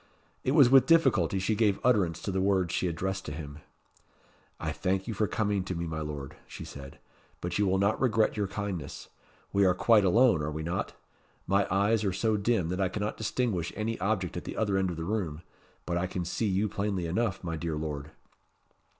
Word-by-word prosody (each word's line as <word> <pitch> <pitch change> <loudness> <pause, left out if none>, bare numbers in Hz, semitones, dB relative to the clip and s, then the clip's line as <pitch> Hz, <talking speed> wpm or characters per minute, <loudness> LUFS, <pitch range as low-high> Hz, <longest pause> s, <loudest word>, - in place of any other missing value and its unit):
It 130 - +1
was 145 -5 +7
with 130 0 +6
difficulty 135 - +4
she 95 +4 0
gave 105 -2 +2
utterance 90 -10 +2
to 100 - -2
the 95 0 0
words 95 -3 +1
she 90 - 0
addressed 95 +3 -2
to - - -5
him. 75 0 -7 1.0
"I - - -2
thank 95 +2 -1
you 115 - -2
for 105 +1 0
coming 105 -3 0
to 95 - -3
me, 85 +1 -3
my 80 -1 -4
Lord," 75 -3 -6
she - - -8
said; 70 +1 -10 0.4
"but 90 +2 -3
you 105 - +3
will 95 +1 +2
not 100 +2 +1
regret 115 -4 +2
your 105 -2 -1
kindness. 95 -6 -5 0.4
We 100 - +4
are 90 -2 +4
quite 110 +2 +4
alone, 110 -2 +4
are 75 - -2
we 80 +1 -4
not? 90 +4 -3 0.5
My 100 +1 +2
eyes 105 +3 +2
are 100 - +1
so 110 +3 +1
dim 100 -4 +1
that 90 +2 -2
I 95 - +2
cannot 105 +2 -3
distinguish 110 -6 -1
any 110 +1 -2
object 95 -2 -1
at 90 - -4
the - - -6
other 105 -3 +1
end 95 -1 +1
of 85 - -5
the 80 - -4
room 90 -6 -2 0.4
but 85 0 -1
I 90 - -1
can 90 -1 -4
see 110 +6 -1
you 100 +2 +1
plainly 100 -3 -2
enough, 95 +3 -1
my 85 -2 -3
dear 80 -1 -3
Lord." 75 -1 -4
95 Hz, 210 wpm, -29 LUFS, 85-105 Hz, 1.0 s, was